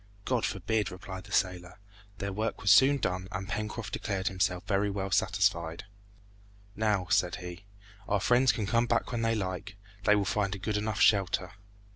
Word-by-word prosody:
"God 125 -3 +1
forbid!" 105 +2 -1
replied 95 0 -8
the 100 - -14
sailor. 90 -2 -1 0.4
Their 100 0 -4
work 110 +3 -2
was 100 - +5
soon 135 +5 +7
done, 90 -6 -2
and 100 0 -4
Pencroft 110 +1 -4
declared 95 -1 -1
himself 90 -1 0
very 100 0 +1
well 95 -1 -3
satisfied. 95 -4 +1 0.9
"Now," 105 -3 +1
said 90 -1 +2
he, 90 +2 -9 0.4
"our 105 - +2
friends 125 +5 +4
can 110 - -3
come 115 +3 +2
back 120 +1 0
when 120 -2 -2
they 115 0 +1
like. 95 -1 -4 0.3
They 105 - +6
will 100 -1 +1
find 100 0 0
a - - -6
good 105 +2 -3
enough 105 0 -2
shelter." 95 -2 +3
100 Hz, 175 wpm, -29 LUFS, 95-110 Hz, 0.9 s, soon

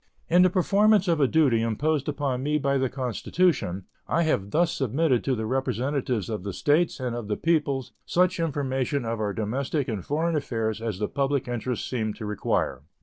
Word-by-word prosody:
In 175 +2 +6
the 185 - +6
performance 200 +2 +3
of 165 -3 +2
a 135 - +5
duty 135 -7 +3
imposed 140 +6 0
upon 140 -3 -2
me 150 +2 +1
by 140 -2 +1
the 130 -1 +1
Constitution 125 - 0 0.2
I 170 - +2
have 100 -11 0
thus 165 +7 +2
submitted 135 0 +1
to 135 - +1
the 110 -1 -3
representatives 130 -2 -1
of 110 -4 -3
the 100 0 -5
States 155 - +1
and 125 -2 -2
of 120 -3 -5
the 105 - -1
people 150 -6 +1 0.2
such 180 0 +1
information 140 -4 -1
of 115 0 -2
our 105 -1 -1
domestic 130 +7 -2
and 105 -6 -3
foreign 160 +3 0
affairs 115 -6 -2
as 110 -5 -3
the 105 +1 -1
public 140 -2 -1
interests 120 0 -3
seem 110 -4 -2
to 110 - -7
require. 105 -10 -1
135 Hz, 190 wpm, -26 LUFS, 115-155 Hz, 0.2 s, In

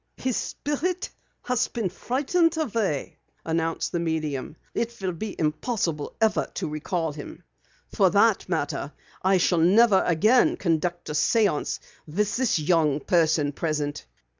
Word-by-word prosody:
"His 255 -3 -1
Spirit 340 +6 -2 0.3
has 250 -2 +1
been 220 -6 -2
frightened 295 - 0
away," 225 - -2 0.3
announced 165 0 -1
the 175 - -1
medium. 155 -4 -2 0.2
"It 235 0 -2
will 190 -2 -1
be 195 +5 -6
impossible 160 - -1
ever 220 -2 +2
to - - -2
recall 160 +2 -2
him. 145 -1 -9 0.5
For - - +4
that - - +3
matter, - - -2 0.3
I 190 0 +3
shall 175 -1 +2
never 195 +4 +5
again 225 - +4
conduct 175 - -1
a - - -3
séance 195 +1 +1 0.3
with 200 +6 -1
this 255 -6 +2
young 155 -2 +2
person 160 -4 +2
present. 150 - -3
180 Hz, 135 wpm, -25 LUFS, 155-230 Hz, 0.5 s, never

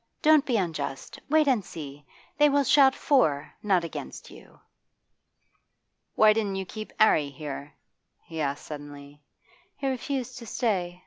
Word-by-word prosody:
'Don't 305 -2 +5
be 245 -4 +2
unjust. 150 -8 -4
Wait 310 0 +4
and 245 -7 +2
see. 145 -4 -9 0.4
They 295 0 +6
will 285 0 +3
shout 270 0 +5
for, 155 - +1
not 195 -5 +2
against 165 - -8
you.' - - -16 1.6
'Why 215 0 +6
didn't 210 -3 -1
you 190 0 -3
keep 215 +3 -8
'Arry 155 -9 +4
here?' 140 0 -8 0.5
he 160 -1 -6
asked 140 -1 -3
suddenly. 145 -1 -10 0.6
'He 280 - -6
refused 260 -1 -3
to 230 - -10
stay. 180 -7 -1
190 Hz, 140 wpm, -27 LUFS, -, 1.6 s, They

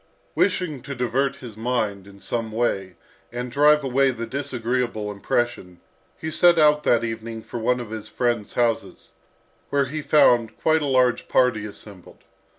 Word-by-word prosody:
Wishing 180 -8 0
to 140 - -7
divert 130 +3 0
his 120 -5 -10
mind 110 -4 -2
in 100 0 -15
some 115 +1 -3
way 100 -5 -1 0.4
and 125 0 -5
drive 150 +3 +4
away 135 +1 +2
the 115 -2 -4
disagreeable 120 -4 -2
impression, 100 -3 -2 0.4
he 160 - -5
set 175 +1 +5
out 150 -1 +5
that 120 -5 +2
evening 115 0 -5
for 120 - -6
one 125 +2 +1
of 115 -3 -7
his 110 -1 -6
friends' 120 -1 -2
houses, 120 -2 -1 0.6
where 140 -1 +1
he 155 +4 -5
found 120 -7 +3
quite 160 0 +2
a 145 - -1
large 130 -2 +2
party 120 -5 +2
assembled. 100 -3 -12
120 Hz, 155 wpm, -23 LUFS, 110-135 Hz, 0.6 s, set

